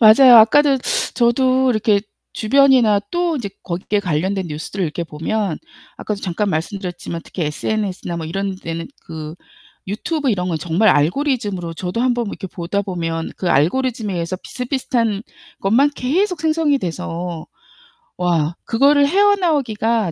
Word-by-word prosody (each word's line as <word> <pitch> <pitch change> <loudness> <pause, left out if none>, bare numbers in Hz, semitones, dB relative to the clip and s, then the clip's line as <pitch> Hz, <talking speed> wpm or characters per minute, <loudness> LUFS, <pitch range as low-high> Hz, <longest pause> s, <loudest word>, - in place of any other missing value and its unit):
맞아요. 240 +3 +8
아까도 270 +5 +6 0.4
저도 255 +2 +3
이렇게 215 -3 +2 0.3
주변이나 245 -3 +4
또 345 -2 0
이제 235 -7 -4
거기 180 0 -5
게 205 - +2
관련된 185 +2 -1
뉴스들을 160 +5 -4
이렇게 165 +1 -3
보면 165 +3 -2 0.4
아까도 210 -2 -4
잠깐 200 +2 -1
말씀드렸지만 175 0 -4
특히 180 - -5
SNS나 185 +3 -3
뭐 160 - -5
이런 195 +4 -3
데는 165 -2 -5 0.2
그 155 -1 -7 0.5
유튜브 270 - -2
이런 180 -4 -1
건 165 - -1
정말 175 +7 +2
알고리즘으로 190 - +1
저도 180 +6 -3
한번 245 -2 +1
이렇게 200 - -6
보다 185 +2 -3
보면 165 -4 -3
그 180 - -2
알고리즘에 215 - +1
의해서 170 +1 -3
비슷비슷한 240 -2 -2 0.4
것만 240 +9 +3
계속 350 +8 0
생성이 310 -2 +2
돼서 170 -3 -5 0.7
와 170 -3 0
그거를 280 +4 +4
헤어나오기가 285 - +2
205 Hz, 340 characters per minute, -19 LUFS, 175-255 Hz, 0.7 s, 맞아요